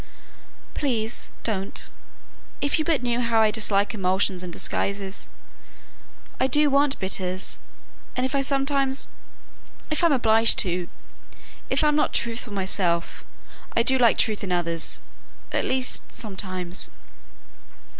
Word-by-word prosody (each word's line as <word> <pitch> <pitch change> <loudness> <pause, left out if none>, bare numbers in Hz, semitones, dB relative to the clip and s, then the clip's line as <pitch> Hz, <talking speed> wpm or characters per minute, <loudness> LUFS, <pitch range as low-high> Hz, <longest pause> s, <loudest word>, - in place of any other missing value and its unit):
"Please, 235 -5 -1
don't. 195 -3 -3 0.7
If 285 +2 +1
you 310 - 0
but 315 -7 +1
knew 240 0 0
how 230 -1 +2
I 220 -1 +4
dislike 210 -1 +1
emulsions 190 -1 +1
and 180 -1 -6
disguises! 195 +2 -3 1.1
I 260 - +3
do 295 +2 +3
want 280 0 +3
bitters 185 -1 -1 0.6
and 255 - +1
if 260 - -2
I 275 - +2
sometimes 275 0 +1 0.8
if 305 - -1
I'm 335 - +5
obliged 225 -3 +4
to 175 -1 -2 0.8
if - - +2
I'm 300 -1 +3
not 300 - +1
truthful 235 -1 -2
myself, 185 -3 -1 0.5
I 230 - +5
do 260 +2 +3
like 235 -3 +5
truth 215 -3 +1
in 190 - -3
others 170 -2 0 0.5
at - - 0
least, 260 -1 0
sometimes." 185 -4 0
225 Hz, 125 wpm, -24 LUFS, 190-265 Hz, 1.1 s, I'm